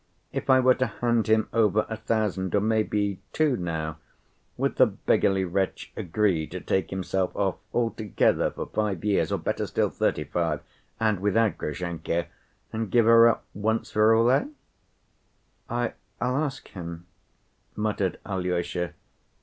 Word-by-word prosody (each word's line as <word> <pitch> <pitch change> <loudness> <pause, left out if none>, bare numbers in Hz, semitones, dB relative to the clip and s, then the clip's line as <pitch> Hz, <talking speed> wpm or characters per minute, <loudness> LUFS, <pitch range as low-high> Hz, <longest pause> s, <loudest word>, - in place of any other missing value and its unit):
If - - -4
I 130 0 +7
were 130 0 +5
to 130 0 0
hand 120 -2 0
him 110 0 +3
over 110 -2 +3
a 110 - -4
thousand 105 -4 -1
or - - +5
maybe 105 -2 0
two 155 -4 +2
now, 80 -4 -3 0.6
would - - -1
the - - +7
beggarly 95 -1 +1
wretch 95 +2 -2
agree 90 -3 0
to - - -6
take 95 - -1
himself 95 0 -2
off 95 -2 0
altogether 115 -3 +1
for - - -6
five 105 -5 -2
years 105 -2 +2
or, - - +1
better - - -2
still, - - 0
thirty‐five, 80 +3 -1 0.4
and 110 -4 +1
without 105 -1 +1
Grushenka, 85 +2 -2 0.5
and 110 -1 -2
give 120 +1 +4
her 115 0 +8
up 115 - -1
once 110 +3 -1
for 110 +1 +5
all, 115 +2 +4
eh?" 135 - +3 1.2
"I—I'll 120 0 -3
ask 140 -2 -2
him," 85 -2 -8 0.7
muttered 105 -3 -1
Alyosha. 90 -2 -2
105 Hz, 140 wpm, -26 LUFS, 90-115 Hz, 1.2 s, her